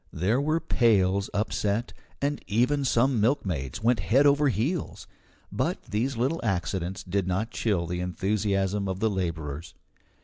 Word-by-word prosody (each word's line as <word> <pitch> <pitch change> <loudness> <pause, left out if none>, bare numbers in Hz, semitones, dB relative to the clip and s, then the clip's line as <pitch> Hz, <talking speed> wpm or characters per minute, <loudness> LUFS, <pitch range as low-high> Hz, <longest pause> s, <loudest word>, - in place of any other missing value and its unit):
There 105 - +1
were 155 +3 +1
pails 100 - +2
upset, 105 +2 -1 0.3
and 145 +1 -1
even 125 +7 +2
some 125 -1 +2
milkmaids 100 - -1
went 120 0 +3
head 135 +6 +3
over 145 0 +4
heels. 135 - -2 0.5
But - - -1
these 120 +5 -2
little 135 +8 0
accidents 95 -1 -2
did 95 0 -1
not 100 +5 -1
chill 100 -7 0
the 90 +1 -3
enthusiasm 100 +2 0
of 95 0 -3
the 110 0 +1
labourers. 80 -5 -4
105 Hz, 140 wpm, -27 LUFS, 95-125 Hz, 0.5 s, over